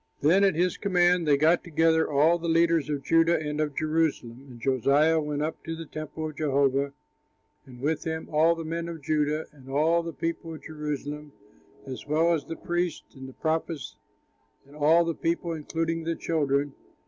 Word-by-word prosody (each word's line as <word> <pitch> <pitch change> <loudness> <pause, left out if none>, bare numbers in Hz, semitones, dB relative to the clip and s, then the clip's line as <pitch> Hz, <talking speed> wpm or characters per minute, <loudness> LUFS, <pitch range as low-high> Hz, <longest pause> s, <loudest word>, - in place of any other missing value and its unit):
Then 175 +7 +4
at 195 -4 +3
his 180 +2 +1
command 180 -3 +2
they 145 -1 +5
got 160 +4 +3
together 160 -1 +2
all 155 +4 +3
the 170 - -4
leaders 165 -2 +3
of 145 -2 -2
Judah 165 +1 +3
and 150 0 -3
of 150 -2 -2
Jerusalem. 155 -5 -1
And 120 -2 -12
Josiah 140 +6 +3
went 150 -1 -2
up 155 +1 -4
to 165 - -4
the 165 0 -7
temple 155 +1 -6
of 155 - -8
Jehovah, 140 -1 +1 0.7
and 125 -1 -13
with 155 +3 -1
him 160 0 -4
all 160 +2 +4
the 165 -1 -6
men 165 +1 -3
of 165 -3 -8
Judah 150 +1 0
and 135 -3 -16
all 160 +5 +2
the 165 0 -5
people 165 +2 -4
of - - -13
Jerusalem, 150 -1 -5 0.5
as 130 +1 -8
well 160 +3 +3
as 150 -4 -2
the 165 - -6
priests 175 -1 -3
and 130 -1 -9
the - - -13
prophets 160 -1 -3 0.7
and 140 +2 -17
all 160 +3 +4
the 165 - -1
people, 170 +1 -2
including 165 +1 -2
the 165 0 -2
children. 145 -4 0
155 Hz, 185 wpm, -27 LUFS, 145-165 Hz, 0.7 s, they